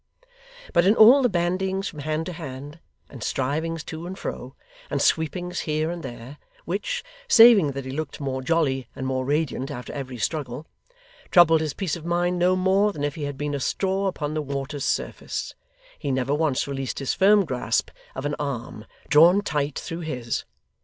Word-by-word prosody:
But 170 - +5
in 205 - +5
all 240 +6 +8
the 250 - +3
bandyings 190 +2 -1
from 150 - -8
hand 155 +2 -2
to 180 - -5
hand, 145 -1 -8 0.3
and 130 - -10
strivings 155 +5 -2
to 160 +3 -7
and 190 +1 -7
fro, - - -6 0.3
and - - -1
sweepings 175 +3 0
here 155 +1 -1
and 175 -1 -5
there, 130 +1 -9 0.3
which - - -2 0.2
saving 225 - +7
that 135 -1 -5
he 130 - -5
looked 155 +1 -5
more 135 -2 -3
jolly 135 -4 0
and 130 - -5
more 130 0 -1
radiant 145 -1 -1
after 125 -4 -7
every 130 -3 -6
struggle 140 +2 -3 0.6
troubled 165 -2 +6
his 155 -3 -3
peace 185 -6 -2
of 170 - -9
mind 175 +1 0
no 180 +1 +3
more 190 +3 +3
than 145 -7 -6
if 145 -1 -1
he 150 -1 -5
had 145 -1 -5
been 145 0 -3
a 140 - -1
straw 195 +7 0
upon 155 -5 -3
the 155 - -1
water's 140 0 -4
surface, - - -3 0.5
he 145 - -3
never 130 +1 0
once 150 -3 +1
released 135 -2 -4
his 135 - -1
firm 200 +1 +5
grasp 130 -5 -1 0.2
of 130 - -5
an 145 - -1
arm, 120 -6 -5 0.2
drawn 170 +7 +6
tight 145 -6 -1
through 165 - -5
his. 125 -8 -3
155 Hz, 185 wpm, -24 LUFS, 135-175 Hz, 0.6 s, all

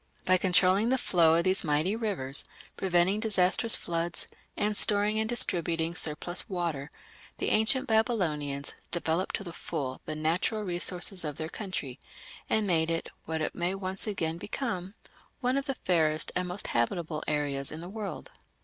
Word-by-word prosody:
By 185 0 +5
controlling 185 +4 +3
the 260 - +3
flow 165 -8 +4
of 170 - +2
these 190 +1 +1
mighty 155 +6 +1
rivers, 190 - -1 0.3
preventing 185 +2 +2
disastrous 215 +1 +4
floods, 170 0 -1 0.3
and 210 +1 0
storing 210 +1 +3
and 220 0 -1
distributing 170 -7 +2
surplus 175 +2 -2
water, 170 -6 -2 0.5
the - - -1
ancient 225 +5 +3
Babylonians 160 - 0 0.2
developed 170 +1 -1
to - - -3
the 170 -3 -8
full 135 -7 -4
the 155 - -2
natural 170 +8 0
resources 180 0 0
of 150 -2 -4
their 160 0 -4
country, 175 - -5 0.5
and 220 -1 +2
made 165 -4 +2
it 165 0 -1 0.2
what 160 0 -2
it - - -2
may 175 +2 0
once 190 +1 -4
again 165 -5 -2
become 195 -4 -4 0.4
one 255 -1 +1
of 275 0 0
the 270 -2 -2
fairest 160 -6 +1
and 180 0 0
most 180 +2 -3
habitable 155 +6 -1
areas 145 -2 -1
in 155 - -6
the 170 - -7
world. 205 +1 -6
175 Hz, 160 wpm, -29 LUFS, 160-205 Hz, 0.5 s, By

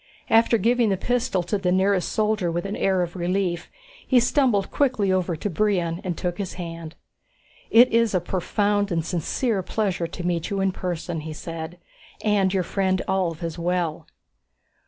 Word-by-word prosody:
After 230 +1 +5
giving 235 0 +2
the 195 - +1
pistol 235 -4 0
to 185 +4 -1
the 180 -2 0
nearest 190 0 +2
soldier 210 -5 +1
with 175 +3 -2
an 200 - -3
air 190 -2 +1
of 175 +1 -6
relief, 180 -1 -1 0.4
he 255 - +5
stumbled 240 -5 +2
quickly 250 -9 +1
over 185 -2 0
to 160 - -3
Brion 180 -2 0
and 180 -4 -3
took 175 0 -3
his 195 -3 -3
hand. 165 -2 -7 0.7
"It 240 +2 +7
is 230 -3 +3
a - - +4
profound 205 +3 0
and 165 -2 0
sincere 195 - -1
pleasure 185 -3 -1
to 175 +1 -7
meet 175 -1 -1
you 200 - -2
in 195 0 +2
person," 175 -2 -4
he 155 0 -6
said. 165 +2 -7 0.5
"And 205 -3 +2
your 190 -1 +1
friend 190 0 0
Ulv 175 -4 -1
as 165 0 -4
well." 170 -2 -1
185 Hz, 175 wpm, -24 LUFS, 170-205 Hz, 0.7 s, It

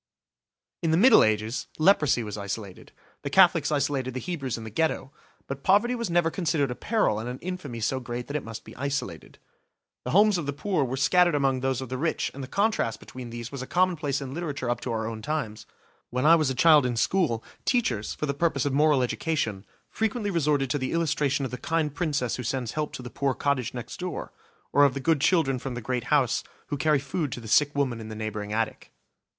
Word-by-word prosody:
In 165 - 0
the 160 - +3
Middle 230 +4 +7
Ages, 110 +3 0
leprosy 155 -8 +4
was 105 -2 -5
isolated: 100 -1 -6 0.3
the 140 - -4
Catholics 170 -3 +5
isolated 135 -3 -1
the - - -1
Hebrews 140 -7 -3
in 115 - -7
the 110 - -8
Ghetto; 135 +1 -1 0.3
but 135 0 -6
poverty 205 - +3
was 235 -5 -3
never 170 -1 +2
considered 160 -7 0
a - - -4
peril 215 - +1
and 115 +2 -4
an 125 - -5
infamy 170 -8 -6
so 130 +5 0
great 120 -1 -5
that 140 - -6
it 150 - -1
must 115 0 -8
be - - -12
isolated. 140 - -4 0.7
The - - -4
homes 205 +1 +4
of 150 - -5
the 145 - -1
poor 175 +1 0
were 130 0 -3
scattered 175 +4 +4
among 135 -2 +1
those 130 0 -1
of 130 - -6
the 130 0 -4
rich 160 +3 -1
and 140 - -7
the - - -6
contrast 200 - 0
between 125 -2 -9
these 120 +1 -7
was 140 -2 -5
a 130 - -6
commonplace 165 -6 +1
in 135 -1 -6
literature 145 -7 -3
up 120 - -2
to 125 - -3
our 110 -1 -2
own 110 -1 -5
times. 110 -7 -4
Indeed, - - -32 0.4
when 125 +3 -1
I 160 - +8
was 155 -4 +2
a 130 - -2
child 155 +1 +6
in 125 -2 -1
school, 120 -7 +1 0.2
teachers, 235 - 0
for - - -2
the 140 - -1
purpose 160 +2 0
of 140 - 0
moral 145 -2 +4
education, 120 -7 -2 0.2
frequently 220 -1 -1
resorted 145 -6 +1
to 145 - 0
the 130 -1 -2
illustration 145 -4 +1
of 130 - -5
the 125 - -5
kind 160 -3 -1
princess 145 -7 -1
who 125 - -5
sends 125 -1 -2
help 150 -1 -2
to 130 - -7
the 125 - -8
poor 135 -2 -1
cottage 130 -4 -1
next 120 - -7
door, 180 -3 -5 0.4
or 145 - +6
of 140 -2 +4
the - - -2
good 150 +1 +1
children 145 -6 +2
from 130 -1 -5
the - - -3
great 125 +1 -3
house 140 -5 +2 0.3
who - - -1
carry 150 +2 +3
food 140 +1 -3
to - - -5
the 115 - -10
sick 145 +6 +3
woman 130 -5 0
in 110 -1 -8
the 110 - -6
neighbouring 105 -1 -4
attic. 115 +1 -2
140 Hz, 230 wpm, -26 LUFS, 120-160 Hz, 0.7 s, I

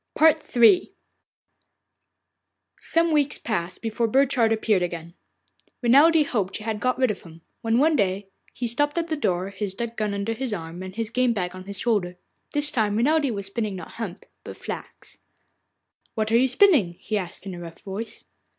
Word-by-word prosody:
III 310 -1 +5 1.9
Some 330 0 +1
weeks 290 -2 +2
passed 190 -5 -3
before 225 +1 0
Burchard 255 -2 +3
appeared 215 -3 +2
again. 170 -1 -4 0.7
Renelde 295 +6 +6
hoped 200 -8 -2
she 215 - -5
had 220 -1 -2
got 255 +2 0
rid 255 -3 +3
of 195 - -7
him, 165 -1 -14 0.2
when 225 0 +1
one 310 +4 +4
day 195 -4 0 0.3
he 245 - -4
stopped 290 +7 0
at 335 0 -1
the 315 - 0
door, 185 -9 -1
his 195 0 -4
duck 235 +2 -4
gun 210 -2 -1
under 200 +3 -2
his 235 -2 -3
arm 165 0 -7
and 185 0 -7
his 225 0 -2
game 250 0 +2
bag 180 -4 -3
on 185 0 -9
his 200 0 -6
shoulder. 190 -5 0 0.3
This 295 0 0
time 215 -6 +1
Renelde 290 +4 +3
was 200 -4 -3
spinning 205 0 -3
not 180 -3 -8
hemp, 210 -5 -6 0.2
but - - -9
flax. - - -8 1.0
'What 220 0 -1
are 230 - +5
you 260 +2 +4
spinning?' 260 - +4
he 215 +5 -5
asked 185 -2 -4
in 195 - -5
a 175 - -7
rough 165 -1 -9
voice. 205 +3 -6
225 Hz, 180 wpm, -24 LUFS, 190-260 Hz, 1.9 s, Renelde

